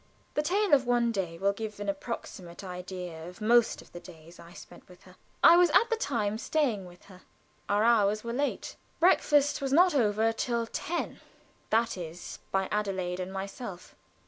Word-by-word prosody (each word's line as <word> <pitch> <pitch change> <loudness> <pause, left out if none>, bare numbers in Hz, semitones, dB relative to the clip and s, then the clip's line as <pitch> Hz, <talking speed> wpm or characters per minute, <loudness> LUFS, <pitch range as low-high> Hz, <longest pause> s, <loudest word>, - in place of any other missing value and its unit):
The - - +1
tale 385 +4 +1
of 265 -3 +4
one 240 -1 +2
day 180 -6 -3
will 200 +3 +1
give 215 0 -6
an 205 - -5
approximate 195 -3 -6
idea 180 -2 -7
of 180 - -14
most 235 +2 +3
of - - -22
the 175 - -9
days 170 -1 -14
I 170 - -13
spent - - -14
with 180 - -17
her. 185 0 -17 0.3
I 340 - +9
was 355 -1 +5
at 455 +9 +3
the - - +3
time 220 - -2
staying 240 -11 0
with 175 0 -16
her. 185 -2 -15 0.5
Our 205 +1 +2
hours 215 -2 +3
were 235 0 -4
late. 280 +3 -3 0.2
Breakfast 290 -5 +3
was 270 -1 -2
not 355 +5 +5
over 225 -3 +2
till 235 0 -1
ten, 340 +8 -4 0.5
that 230 -1 +1
is 170 0 -8
by 190 -1 0
Adelaide 190 -4 -2
and 185 +1 -4
myself. 195 0 -7
210 Hz, 180 wpm, -29 LUFS, 185-245 Hz, 0.5 s, I